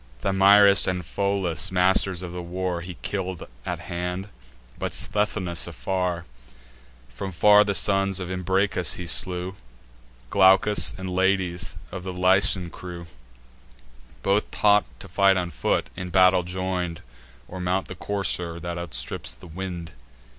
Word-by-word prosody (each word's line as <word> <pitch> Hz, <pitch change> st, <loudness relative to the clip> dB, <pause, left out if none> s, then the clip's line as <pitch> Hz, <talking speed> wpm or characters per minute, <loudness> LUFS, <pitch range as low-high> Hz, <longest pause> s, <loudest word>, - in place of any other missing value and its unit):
Thamyris 100 Hz, +2 st, +6 dB
and 90 Hz, -2 st, -2 dB
Pholus, 95 Hz, -3 st, 0 dB
masters 95 Hz, 0 st, +2 dB
of 90 Hz, -, -6 dB
the 90 Hz, 0 st, -6 dB
war, 90 Hz, 0 st, -3 dB
He 90 Hz, +1 st, -8 dB
kill'd 95 Hz, -3 st, -4 dB, 0.2 s
at -, -, -2 dB
hand, 90 Hz, +3 st, -5 dB, 0.5 s
but -, -, -2 dB
Sthenelus 90 Hz, -5 st, 0 dB
afar: 90 Hz, -3 st, -3 dB, 0.8 s
From 60 Hz, +11 st, -7 dB
far 105 Hz, +4 st, +6 dB
the 100 Hz, -1 st, -2 dB
sons 95 Hz, -1 st, +2 dB
of 90 Hz, -, -5 dB
Imbracus 95 Hz, -1 st, +1 dB
he 90 Hz, -, -7 dB
slew, 90 Hz, +2 st, 0 dB, 0.8 s
Glaucus 95 Hz, +2 st, +4 dB
and 95 Hz, 0 st, -6 dB
Lades, 95 Hz, -2 st, 0 dB
of 90 Hz, -1 st, -7 dB
the 95 Hz, 0 st, -5 dB
Lycian 90 Hz, -1 st, +2 dB
crew; 85 Hz, -1 st, -9 dB, 1.2 s
Both 100 Hz, +2 st, +1 dB
taught 105 Hz, 0 st, +3 dB, 0.2 s
to -, -, -10 dB
fight 95 Hz, +2 st, +3 dB
on 90 Hz, -1 st, -2 dB
foot, -, -, -1 dB
in 90 Hz, 0 st, -6 dB
battle 90 Hz, 0 st, +4 dB
join'd, 90 Hz, -1 st, -4 dB, 0.5 s
Or 95 Hz, -, -8 dB
mount 90 Hz, +1 st, -1 dB
the -, -, -7 dB
courser 90 Hz, -3 st, -1 dB
that 85 Hz, +1 st, -5 dB
outstrips -, -, -3 dB
the 60 Hz, -, -15 dB
wind. 85 Hz, -1 st, -7 dB
90 Hz, 135 wpm, -24 LUFS, 90-95 Hz, 1.2 s, Thamyris